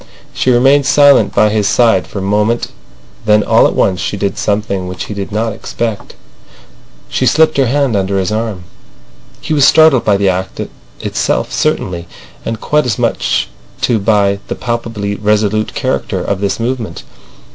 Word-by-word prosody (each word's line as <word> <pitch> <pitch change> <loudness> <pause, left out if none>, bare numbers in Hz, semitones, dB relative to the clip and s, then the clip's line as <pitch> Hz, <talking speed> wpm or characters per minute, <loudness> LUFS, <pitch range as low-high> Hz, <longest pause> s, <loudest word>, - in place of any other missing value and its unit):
She - - 0
remained 135 +3 +4
silent 140 -8 +5
by 105 - +4
his 105 -1 0
side 110 -8 +2
for 100 - -6
moment, 105 +4 0 0.6
then 105 0 +4
all - - +4
at - - -4
once 95 -2 +1
she 100 - -3
did 100 0 -2
something 100 -3 -2
which 90 -1 -5
he - - -6
did 100 0 -5
not 110 +1 -1
expect. 115 0 -5 0.9
She - - 0
slipped 160 0 +3
her 135 -2 +3
hand 135 -2 +1
under 100 0 0
his 95 +1 -1
arm. 110 -4 -3 0.8
He - - -3
was 145 -2 +3
startled 155 -2 +5
by 100 -2 +2
the 100 0 +1
act 95 0 -2 0.4
itself - - -1
certainly, 85 -2 -1 0.4
and 115 -1 -4
quite 150 +1 0
as 110 - -1
much - - 0 0.3
too 115 -3 +1
by 100 -1 +1
the - - -3
palpably 115 -4 -3
resolute 105 +1 0
character - - -2
of 100 -1 -2
this 100 +2 -1
movement. 115 -6 -4
105 Hz, 165 wpm, -14 LUFS, 100-120 Hz, 0.9 s, silent